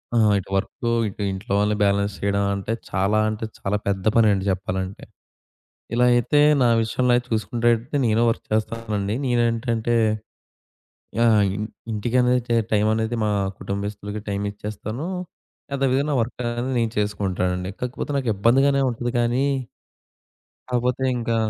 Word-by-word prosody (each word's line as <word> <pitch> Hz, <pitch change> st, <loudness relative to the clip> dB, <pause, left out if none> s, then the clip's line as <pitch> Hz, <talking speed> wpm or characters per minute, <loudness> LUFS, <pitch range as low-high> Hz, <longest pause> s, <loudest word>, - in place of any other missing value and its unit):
ఆ! -, -, +4 dB, 0.2 s
ఇటు 95 Hz, -, -10 dB
వర్కు, 115 Hz, +4 st, -2 dB, 0.2 s
ఇటు 100 Hz, +1 st, -7 dB
ఇంట్లో 95 Hz, +2 st, -7 dB
వాళ్ళని 105 Hz, +1 st, +2 dB
బ్యాలెన్స్ 100 Hz, 0 st, +2 dB
చేయడం 100 Hz, 0 st, +1 dB
అంటే 100 Hz, +3 st, -3 dB, 0.2 s
చాలా 100 Hz, +3 st, +1 dB
అంటే 110 Hz, +1 st, -3 dB
చాలా 105 Hz, +2 st, -1 dB
పెద్ద 95 Hz, 0 st, -1 dB
పనండి 105 Hz, -4 st, +4 dB
జెప్పాలంటే. 95 Hz, 0 st, -3 dB, 0.9 s
ఇలా 125 Hz, +1 st, +4 dB
అయితే 120 Hz, +5 st, +3 dB, 0.2 s
నా 125 Hz, -, +5 dB
విషయంలో 125 Hz, +3 st, +1 dB
అయితే 125 Hz, 0 st, -1 dB
చూసుకునే‌టట్టయితే 120 Hz, +3 st, 0 dB
నేనూ 115 Hz, +1 st, +3 dB
వర్క్ -, -, -3 dB
చేస్తానండి. 110 Hz, -1 st, -1 dB
నేనేంటంటే 120 Hz, -1 st, +1 dB, 1.2 s
యాహ్! 115 Hz, -3 st, +5 dB
ఇన్ 105 Hz, +1 st, -3 dB, 0.3 s
ఇంటికనేది 125 Hz, +3 st, +2 dB
టె 120 Hz, -, +2 dB, 0.2 s
టైం 105 Hz, 0 st, +3 dB
అనేది 110 Hz, +1 st, -1 dB
మా 105 Hz, -, +1 dB, 0.3 s
కుటుంబస్తులకి 100 Hz, +1 st, -4 dB
టైం 100 Hz, 0 st, -2 dB
ఇచ్చేస్తాను. 110 Hz, -, -6 dB, 0.7 s
అదే 135 Hz, 0 st, +1 dB
విధంగా 140 Hz, +3 st, +1 dB
నా 140 Hz, -, +1 dB
వర్క్ 115 Hz, +1 st, -4 dB
అనేది 120 Hz, +3 st, -2 dB
నేను 115 Hz, -1 st, 0 dB
చేసుకుంటానండి. 95 Hz, -3 st, -1 dB
కాకపోతే 125 Hz, +3 st, -3 dB
నాకు 130 Hz, -4 st, -1 dB
ఇబ్బందిగానే 135 Hz, +6 st, +3 dB
ఉంటది 120 Hz, +1 st, -3 dB
కానీ 120 Hz, +3 st, +1 dB, 1.3 s
కాపోతే 125 Hz, +1 st, 0 dB
ఇంకా 115 Hz, -1 st, -1 dB
110 Hz, 135 wpm, -23 LUFS, 100-120 Hz, 1.3 s, నా